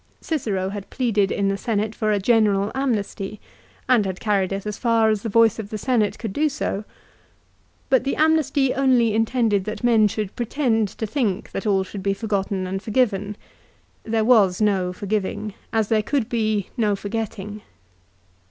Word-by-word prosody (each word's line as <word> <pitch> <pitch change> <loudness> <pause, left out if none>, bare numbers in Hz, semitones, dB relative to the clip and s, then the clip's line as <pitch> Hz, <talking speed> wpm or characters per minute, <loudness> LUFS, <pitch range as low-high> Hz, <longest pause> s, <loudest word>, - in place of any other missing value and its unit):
Cicero 205 - -2
had 200 -1 -7
pleaded 215 -6 +1
in 200 - 0
the 195 - -1
Senate 215 -1 -1
for 215 -2 -1
a 210 - +2
general 205 -1 +2
amnesty, 215 -6 -2 0.5
and 245 -4 +4
had 190 -2 -4
carried 200 -3 0
it 195 +1 -3
as 210 0 -4
far 230 -2 +3
as 215 -2 -1
the 225 - -3
voice 225 0 +4
of 205 -2 -6
the 215 - -4
Senate 220 -2 0
could 220 -5 -5
do 305 +5 +2
so. 245 -7 -3 1.0
But 260 -2 +3
the 275 - -1
amnesty 305 -4 +2
only 250 -5 +3
intended 225 -3 +1
that 215 +1 -5
men 225 -3 +5
should 205 -1 -4
pretend 235 -3 0
to 220 - -5
think 215 -5 -2
that 195 - -4
all 195 -2 +2
should 195 +1 -8
be 195 +1 0
forgotten 195 -3 -2
and 190 +1 -3
forgiven. 210 -3 0 0.7
There 220 -1 0
was 205 -7 +4
no 195 -4 +1
forgiving, 205 +2 -3 0.2
as 220 -2 0
there 220 -1 +3
could 245 +1 -1
be 215 -4 -1
no 215 -5 +1
forgetting. 210 0 -5
215 Hz, 170 wpm, -22 LUFS, 200-235 Hz, 1.0 s, men